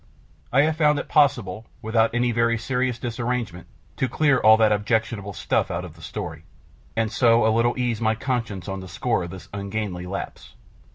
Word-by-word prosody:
I 135 Hz, +3 st, +5 dB
have 155 Hz, +1 st, 0 dB
found 150 Hz, -2 st, +4 dB
it -, -, -4 dB
possible, 115 Hz, -8 st, +2 dB, 0.2 s
without 110 Hz, +1 st, +2 dB
any 120 Hz, 0 st, +2 dB
very 115 Hz, 0 st, +2 dB
serious 125 Hz, 0 st, -1 dB
disarrangement, 120 Hz, -6 st, -3 dB, 0.3 s
to 130 Hz, -, 0 dB
clear 145 Hz, 0 st, +3 dB
all 110 Hz, -1 st, +7 dB
that 110 Hz, -1 st, +4 dB
objectionable 105 Hz, -1 st, 0 dB
stuff -, -, 0 dB
out 85 Hz, +2 st, -3 dB
of 85 Hz, -, -10 dB
the 85 Hz, -, -16 dB
story, -, -, -6 dB, 0.5 s
and 110 Hz, -1 st, 0 dB
so 115 Hz, -3 st, +4 dB
a 110 Hz, -, +3 dB
little 120 Hz, +2 st, +2 dB
ease 120 Hz, -3 st, -1 dB
my 110 Hz, 0 st, +2 dB
conscience 115 Hz, -6 st, -3 dB
on 95 Hz, -1 st, -4 dB
the 95 Hz, -, -8 dB
score 100 Hz, +2 st, -1 dB
of -, -, -8 dB
this 95 Hz, 0 st, -10 dB
ungainly 100 Hz, -2 st, -4 dB
lapse. 95 Hz, +2 st, -7 dB
115 Hz, 185 wpm, -24 LUFS, 100-125 Hz, 0.5 s, all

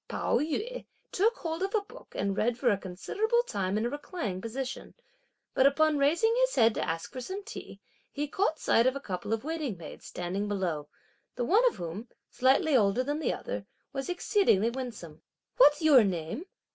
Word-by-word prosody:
Pao -, -, 0 dB
yü 425 Hz, +12 st, -3 dB, 0.3 s
took 440 Hz, +5 st, +2 dB
hold 325 Hz, -3 st, -4 dB
of 390 Hz, +3 st, -1 dB
a 430 Hz, -, +3 dB
book 405 Hz, -, -15 dB
and 200 Hz, 0 st, 0 dB
read 230 Hz, +3 st, +1 dB
for 245 Hz, -1 st, +3 dB
a -, -, +3 dB
considerable 420 Hz, -, 0 dB
time 200 Hz, -, -2 dB
in 220 Hz, -, 0 dB
a -, -, 0 dB
reclining 290 Hz, -, -4 dB
position; 255 Hz, +4 st, -5 dB, 0.6 s
but 265 Hz, -, +5 dB
upon 300 Hz, +1 st, +3 dB
raising 335 Hz, +11 st, +3 dB
his -, -, +2 dB
head 230 Hz, -2 st, +5 dB
to -, -, -2 dB
ask 165 Hz, +7 st, -4 dB
for 255 Hz, -, -5 dB
some 380 Hz, +11 st, -5 dB
tea, 435 Hz, -, -9 dB, 0.3 s
he 295 Hz, +1 st, -3 dB
caught 320 Hz, +1 st, 0 dB
sight 230 Hz, +2 st, +3 dB
of 260 Hz, -, +2 dB
a -, -, -3 dB
couple 190 Hz, -5 st, -5 dB
of 225 Hz, -1 st, 0 dB
waiting 305 Hz, -, -3 dB
maids, 165 Hz, -, -10 dB
standing 185 Hz, +4 st, -3 dB
below; 175 Hz, -8 st, -2 dB, 0.5 s
the 245 Hz, -, -1 dB
one 420 Hz, -, +4 dB
of 485 Hz, -, +1 dB
whom, 175 Hz, +7 st, -6 dB, 0.2 s
slightly 265 Hz, +4 st, +3 dB
older 220 Hz, +1 st, +3 dB
than 290 Hz, +3 st, -2 dB
the -, -, 0 dB
other, -, -, -5 dB, 0.3 s
was 270 Hz, +2 st, -4 dB
exceedingly 350 Hz, -, +2 dB
winsome. 225 Hz, -12 st, -7 dB, 0.4 s
"What's 315 Hz, -9 st, +6 dB
your 285 Hz, -6 st, +7 dB
name?" 180 Hz, -, -3 dB
260 Hz, 190 wpm, -29 LUFS, 200-325 Hz, 0.6 s, your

